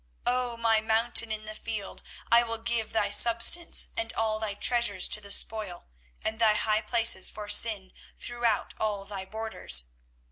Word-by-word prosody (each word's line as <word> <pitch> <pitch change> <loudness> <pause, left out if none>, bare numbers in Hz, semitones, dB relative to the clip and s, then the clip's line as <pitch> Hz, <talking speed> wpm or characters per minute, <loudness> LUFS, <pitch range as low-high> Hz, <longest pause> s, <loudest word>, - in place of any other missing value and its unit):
24:017:003 - - +1
O 240 -2 -6
my 225 -1 +1
mountain 225 +1 +2
in 215 0 -5
the 215 - -7
field, 215 -2 -6 0.3
I 235 0 +6
will 230 -1 -3
give 225 -1 -2
thy 220 -2 -1
substance 235 +11 +4
and 340 - -4
all 220 -1 -2
thy 215 -2 -5
treasures 220 -4 +2
to 210 - +1
the 200 - -12
spoil, 200 -3 -1 0.4
and 220 +1 -3
thy 220 -2 +3
high 215 0 0
places 225 -6 +2
for 210 -1 -9
sin, 205 -2 +2 0.2
throughout 240 -3 -2
all 205 -2 -3
thy 195 -1 -6
borders. 210 - -1
220 Hz, 170 wpm, -27 LUFS, 205-230 Hz, 0.4 s, I